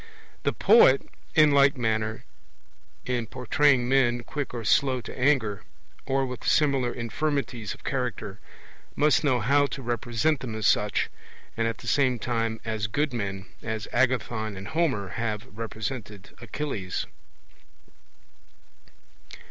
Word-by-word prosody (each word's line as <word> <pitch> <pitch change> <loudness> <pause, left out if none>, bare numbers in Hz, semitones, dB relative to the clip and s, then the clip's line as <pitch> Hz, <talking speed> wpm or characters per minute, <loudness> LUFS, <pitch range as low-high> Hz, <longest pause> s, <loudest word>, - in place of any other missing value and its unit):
The - - +1
poet 195 - +5 0.3
in 155 -1 +6
like 140 0 +5
manner, 110 -2 -1 0.8
in 120 -3 -1
portraying 130 +1 +2
men 120 -2 +2
quick 145 +3 -4
or 120 -2 -5
slow 130 +3 +3
to 120 - -9
anger, 125 -7 +1 0.5
or 135 0 +1
with 125 -2 -7
similar 135 -5 +2
infirmities 125 -2 -3
of - - -21
character, 120 -6 -3 0.6
must 150 +1 +3
know 130 -4 +2
how 140 +5 +3
to 135 -1 -7
represent 120 +5 0
them 115 -4 -5
as 110 -1 -3
such, 105 0 +2 0.4
and 115 0 0
at 115 -1 -3
the 120 - -11
same 130 +1 +2
time 115 -1 -2
as 110 -1 -2
good 145 +5 -1
men, 100 -4 -3 0.2
as 110 -2 -4
Agathon 120 -4 0
and 95 +1 -7
Homer 135 - 0
have 110 +1 -3
represented 110 -2 -6
Achilles. 115 -6 -4
120 Hz, 130 wpm, -26 LUFS, 110-135 Hz, 0.8 s, in